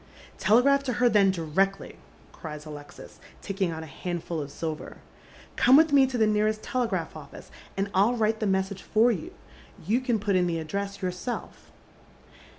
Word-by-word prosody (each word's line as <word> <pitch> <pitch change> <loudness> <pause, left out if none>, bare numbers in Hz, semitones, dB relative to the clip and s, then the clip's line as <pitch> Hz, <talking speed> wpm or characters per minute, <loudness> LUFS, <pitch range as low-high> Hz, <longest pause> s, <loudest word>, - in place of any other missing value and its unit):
" - - -18
Telegraph 275 +6 +4
to 265 -3 -2
her 245 +1 +3
tlicn 200 -2 +5
directly," 190 +3 -1 0.4
cries 150 -1 -8
Alexis, 145 -1 -11 0.2
taking 195 -2 -1
out 160 -1 -5
a - - -8
handful 170 +1 -4
of 145 - -6
silver. 155 +1 -6 0.3
" - - -22
Come 260 +3 +6
with 315 -1 +4
me 270 -2 +6
to 255 -1 -3
the 220 - +4
nearest 215 0 +1
telegraph 220 -10 -2
ofBco, 150 -3 -12 0.3
and 195 +1 0
I'll 205 +6 +3
write 220 -1 +1
the 215 - -1
message 190 0 -1
for 230 +3 +3
you. 180 -9 -4 0.5
You 225 +8 +1
can 245 -3 0
put 205 -1 0
in 180 -1 +3
the 170 -1 -1
address 200 +5 -4
yourself." 180 +7 -5
195 Hz, 175 wpm, -27 LUFS, 170-230 Hz, 0.5 s, Come